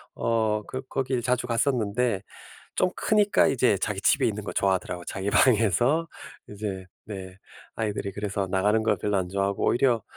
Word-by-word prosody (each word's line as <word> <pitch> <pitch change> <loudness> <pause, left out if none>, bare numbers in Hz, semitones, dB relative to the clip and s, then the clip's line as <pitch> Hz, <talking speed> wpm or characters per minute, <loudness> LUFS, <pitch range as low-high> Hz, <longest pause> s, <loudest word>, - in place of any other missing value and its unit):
어 110 -2 0
그 130 - -5
거기 130 -2 -1
자주 125 0 0
갔었는데 115 -4 0 0.5
좀 185 - +2
크니까 210 -2 +3
이제 - - +2
자기 - - -2
집에 - - +3
있는 - - -2
거 - - -5
좋아하더라고요. 95 -2 -1
자기 95 +1 -3
방에서 120 - +3 0.4
이제 100 -3 -5 0.2
네 95 -2 -8 0.4
아이들이 105 -3 -2
그래서 100 -1 -3
나가는 105 +4 +2
걸 110 - +2
별로 105 -1 -1
안 95 -2 -1
좋아 100 +1 -1
하고 100 - -2
오히려 120 -3 +2
105 Hz, 350 characters per minute, -26 LUFS, 100-125 Hz, 0.5 s, 크니까